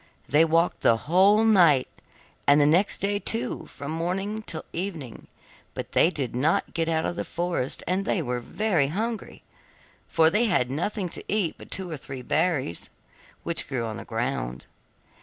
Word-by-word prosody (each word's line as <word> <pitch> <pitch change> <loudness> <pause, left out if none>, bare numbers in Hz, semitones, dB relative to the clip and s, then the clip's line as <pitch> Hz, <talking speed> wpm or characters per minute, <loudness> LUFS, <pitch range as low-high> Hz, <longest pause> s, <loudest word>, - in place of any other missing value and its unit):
They 150 +5 +5
walked 165 +2 +2
the 115 - +4
whole 195 - +4
night 170 -12 +5 0.6
and 145 +1 +6
all 145 - +5
the 150 - +4
next 185 +5 +2
day 200 +1 0
too 230 +4 -3
from 140 +1 -7
morning 190 +6 -2
till 165 -7 -6
evening, 165 - -5 0.5
but - - -5
they - - +5
did 135 -9 -4
not 150 +7 +1
get 165 -1 0
out 160 -1 0
of - - -2
the - - -2
forest, 170 -6 -3
and 185 +3 0 0.2
were 125 0 -1
very 175 - 0
hungry, 220 +8 -4 0.6
for 160 0 +4
they 215 +6 +3
had 130 - +1
nothing 185 +7 -2
to - - -6
eat 200 -6 +1
but - - -12
two 190 -1 -1
or 155 - -4
three 130 -1 -8
berries, 150 - -1 0.5
which 170 -1 0
grew 125 -4 -2
on 110 -1 -5
the - - -7
ground. - - -3
165 Hz, 175 wpm, -26 LUFS, 140-195 Hz, 0.6 s, and